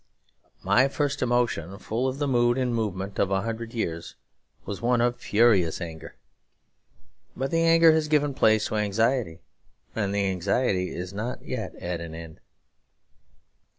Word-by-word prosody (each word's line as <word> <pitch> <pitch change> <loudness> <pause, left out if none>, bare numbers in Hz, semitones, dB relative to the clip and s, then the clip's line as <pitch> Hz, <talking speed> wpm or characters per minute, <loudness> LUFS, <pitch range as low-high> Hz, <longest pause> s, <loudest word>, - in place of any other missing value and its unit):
My 100 +8 +4
first 140 0 -2
emotion, 120 -8 0
full 115 +5 -2
of 130 +1 -3
the 145 0 -1
mood 120 -1 +2
and 125 -2 0
movement 100 -3 -3
of 95 - +2
a 95 0 0
hundred 115 0 -4
years, 85 -8 -4 0.5
was 100 - -5
one 120 +1 +2
of 120 +1 +1
furious 105 -7 +3
anger. 80 -3 -8 1.2
But 135 +2 -2
the 165 - +2
anger 165 0 +6
has 155 -1 +1
given 145 -2 +2
place 110 -3 +3
to 110 - -1
anxiety; 105 -3 0 0.5
and 100 -3 -1
the 100 0 0
anxiety 95 +1 0
is 90 +2 -6
not 115 +5 -5
yet - - -5
at 85 -1 -4
an 80 -1 -7
end. 80 -1 -10
110 Hz, 150 wpm, -26 LUFS, 95-125 Hz, 1.2 s, anger